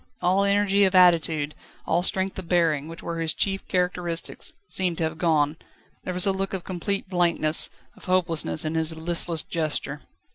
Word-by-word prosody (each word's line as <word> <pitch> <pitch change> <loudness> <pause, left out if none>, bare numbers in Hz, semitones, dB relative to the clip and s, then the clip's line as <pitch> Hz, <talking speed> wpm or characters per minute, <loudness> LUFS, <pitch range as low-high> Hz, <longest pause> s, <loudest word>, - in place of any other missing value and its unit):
All 185 +3 +2
energy 200 0 +3
of 190 0 0
attitude, 165 -4 +4 0.3
all - - +1
strength 190 +1 0
of 175 -3 -9
bearing, 160 -5 +1
which 165 +1 -10
were 170 0 -4
his 160 -1 0
chief 195 -1 -1
characteristics, 180 -2 -2 0.2
seemed 180 -3 -1
to - - -1
have 160 0 -3
gone. 155 -3 +1 0.5
There 185 - -3
was 180 - +4
a 195 - +3
look 195 0 -2
of 185 - -5
complete 190 +2 -2
blankness, 170 -4 +2 0.3
of - - -16
hopelessness 170 - +1
in 155 - -2
his 160 0 +1
listless 165 0 0
gesture. 155 -3 -3
175 Hz, 175 wpm, -24 LUFS, 160-185 Hz, 0.5 s, attitude